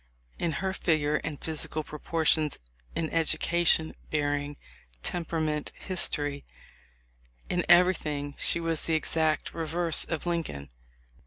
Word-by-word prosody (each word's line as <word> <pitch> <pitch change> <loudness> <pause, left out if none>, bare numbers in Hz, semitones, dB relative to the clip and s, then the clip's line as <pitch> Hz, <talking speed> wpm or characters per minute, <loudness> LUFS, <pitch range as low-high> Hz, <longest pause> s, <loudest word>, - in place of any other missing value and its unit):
In 170 -2 0
her 190 +5 -1
figure 150 -5 +1
and 150 -2 -5
physical 155 -1 -3
proportions, 155 0 +1 0.4
in 160 - 0
education, 165 0 +2 0.2
bearing, 145 -1 -1 0.5
tempera 165 -1 -1
ment, 150 -1 -1
history 145 -6 -1 0.5
— - - -33
in 180 -1 +1
everything 155 -5 +4
she - - +2
was 165 -2 -1
the 165 - 0
exact 155 0 0
reverse 165 0 +2
of 160 -1 -3
Lincoln. 155 - -3
155 Hz, 115 wpm, -29 LUFS, 145-165 Hz, 0.5 s, everything